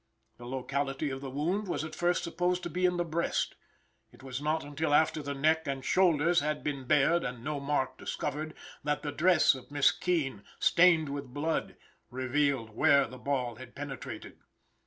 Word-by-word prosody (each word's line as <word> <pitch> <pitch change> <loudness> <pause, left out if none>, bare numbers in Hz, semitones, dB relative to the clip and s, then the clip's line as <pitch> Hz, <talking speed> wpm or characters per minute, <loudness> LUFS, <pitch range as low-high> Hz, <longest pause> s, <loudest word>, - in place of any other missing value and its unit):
The 120 - -10
locality 135 +2 -2
of 135 0 -5
the 135 - -5
wound 175 +10 -1
was 175 - -2
at 155 0 -6
first 175 +2 +1
supposed 180 +1 -1
to 175 - -4
be 180 +2 +2
in 180 0 0
the 175 - 0
breast. 170 +1 -1 0.6
It - - -18
was 130 0 -5
not 155 +2 0
until 145 +1 0
after 155 0 +3
the 140 0 -4
neck 160 +3 +2
and 135 -1 -3
shoulders 170 -2 +4
had 150 +1 -2
been 140 -3 -3
bared 160 +6 +3
and 125 -2 -5
no 145 +1 -2
mark 140 -2 -1
discovered, 155 +2 -4 0.3
that 150 0 -1
the 145 - -2
dress 175 +3 +4
of 130 -2 -10
Miss 145 -1 +4
Keene, 150 - -1 0.2
stained 170 -4 +4
with 140 -2 -6
blood, 160 +3 -1 0.3
revealed 130 -2 0
where 140 +5 +4
the 130 +2 -10
ball 125 -4 -2
had 130 -1 -11
penetrated. 140 -2 -7
145 Hz, 180 wpm, -30 LUFS, 135-160 Hz, 0.6 s, shoulders